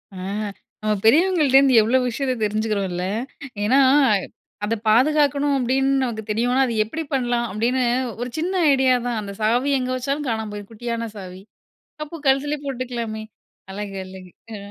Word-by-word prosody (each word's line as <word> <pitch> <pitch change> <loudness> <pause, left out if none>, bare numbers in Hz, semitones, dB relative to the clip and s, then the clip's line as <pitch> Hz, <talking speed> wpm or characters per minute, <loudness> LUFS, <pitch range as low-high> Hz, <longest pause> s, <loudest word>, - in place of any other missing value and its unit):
ஆ. - - -9 0.7
நம்ம 215 0 +1
பெரியவங்கள்ட்டேருந்து 280 -2 +5
எவ்ளோ 230 +5 +2
விஷயத்த 260 +2 -1
தெரிஞ்சுக்கிறோம், 210 -1 -1
இல்ல. 180 +1 -3 0.6
ஏன்னா, 255 +6 +4 0.9
"அத 225 +2 0
பாதுகாக்கணும்." 285 +3 +3
அப்பிடின்னு 270 +2 +1
நமக்கு 225 -3 -3
தெரியுன்னா, 245 +4 +2
"அத 235 - -2
எப்பிடி 315 +10 -5
பண்ணலாம்?" 240 -2 0
அப்பிடின்னு 235 +6 0 0.4
ஒரு 245 - -3
சின்ன 360 +4 -1 0.2
ஐடியா 265 -1 +3
தான். 235 -2 -1
அந்த 200 -1 -7
சாவி 240 +6 +2
எங்கே 255 0 -2
வச்சாலும் 275 +3 -2
காணாம 220 -2 -2
போயிடும். 205 -1 -8
குட்டியான 230 0 -4
சாவி. 185 -2 -9 0.6
அப்போ 305 +3 -9
கழுத்திலே 280 +3 +2
போட்டுக்கலாமே! 240 -4 -4 0.5
அழகு, 200 0 -6
அழகு. 185 -1 -12 0.2
ஆ. - - -5
245 Hz, 145 wpm, -22 LUFS, 215-270 Hz, 0.9 s, பெரியவங்கள்ட்டேருந்து